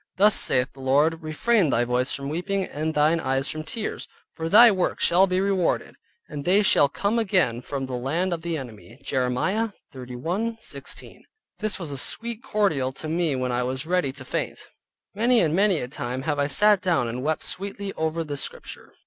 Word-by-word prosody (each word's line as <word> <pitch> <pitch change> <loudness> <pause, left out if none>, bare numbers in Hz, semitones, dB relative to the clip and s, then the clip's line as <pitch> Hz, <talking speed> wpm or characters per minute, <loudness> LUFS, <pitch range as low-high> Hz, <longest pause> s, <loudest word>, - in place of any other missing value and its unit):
"Thus 205 +2 +5
saith 125 +1 +3
the 135 - -17
Lord, 145 +5 +2
refrain 175 +4 +1
thy 120 -2 +2
voice 125 +2 0
from 140 0 -5
weeping, 185 +6 -1
and 155 +2 -4
thine 155 +3 +3
eyes 135 -1 -1
from 155 - -3
tears, 215 +7 -4 0.3
for 160 0 -4
thy 230 +5 +8
work 185 -3 -1
shall 185 +3 +5
be 185 0 0
rewarded, 195 -3 0 0.3
and 145 -1 -6
they 195 +6 +3
shall 145 -7 +5
come 205 +10 0
again 185 - +1
from 135 +1 -4
the 130 - -7
land 160 +9 -1
of 165 - -4
the 170 -1 -2
enemy" 120 -2 -10
(Jeremiah 135 - 0 0.2
31.16). 140 - -5 0.4
This 215 -2 -2
was 170 -6 -6
a 140 - -3
sweet 235 - -2
cordial 165 - 0
to 155 - -7
me 165 -2 0
when 130 -1 -2
I 120 0 0
was 130 +3 -3
ready 180 -5 0
to 130 -1 -10
faint; - - -3 0.6
many 235 +4 +3
and 165 -4 +2
many 200 -1 +3
a 125 - -3
time 125 0 -5
have 145 0 -1
I 140 - +2
sat 205 +7 +4
down 170 -10 +1
and 120 +2 -4
wept 155 +3 -1
sweetly 200 +1 -5
over 160 +1 -2
this 145 -3 -3
Scripture. - - -8
160 Hz, 190 wpm, -24 LUFS, 135-195 Hz, 0.6 s, thy